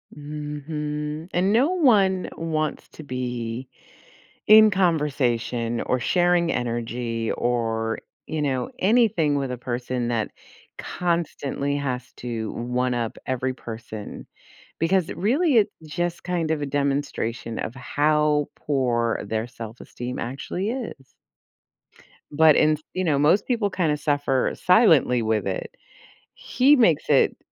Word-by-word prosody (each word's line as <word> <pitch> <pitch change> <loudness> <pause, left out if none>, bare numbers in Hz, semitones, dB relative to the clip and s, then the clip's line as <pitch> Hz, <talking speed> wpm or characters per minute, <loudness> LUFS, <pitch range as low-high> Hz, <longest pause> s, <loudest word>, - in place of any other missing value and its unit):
Mhm. 150 +1 -5
And 185 +3 +2
no 265 +8 +4
one 205 - +3
wants 155 -2 -2
to 155 - -11
be 125 -2 -4 0.8
in 215 0 +8
conversation 125 - 0
or 125 - 0
sharing 175 +3 +2
energy 115 -1 -2
or, 115 -2 -1 0.3
you 155 -1 -3
know, 130 -3 -1
anything 195 -9 +3
with 135 -2 -2
a 125 - -3
person 125 0 -3
that 110 -3 -1 0.5
constantly 145 -5 -2
has 130 -3 -4
to 115 -3 -4
one 125 +1 -1
up 115 -2 -2
every 130 0 -1
person 110 -3 -8 0.5
because 170 +1 +2
really 260 - +2
it's 205 -1 +3 0.2
just 175 +2 -3
kind 170 -3 -1
of 150 -2 -1
a - - -1
demonstration 140 -5 -2
of 115 - -4
how 150 +3 +1
poor 120 -5 0
their 110 +1 -2
self-esteem 120 +2 -7
actually 145 - -3
is. 225 - -6 1.2
But 155 +1 +6
in 155 0 +4 0.2
you 185 - -1
know, 155 -5 +2
most 165 +8 +4
people 230 -5 +1
kinda 160 -6 0
suffer 145 -3 +1
silently 165 - +4
with 110 -3 0
it. 95 - -4 0.6
He 280 +4 +3
makes 175 - +3
it, 140 -3 +4
145 Hz, 120 wpm, -24 LUFS, 120-170 Hz, 1.2 s, in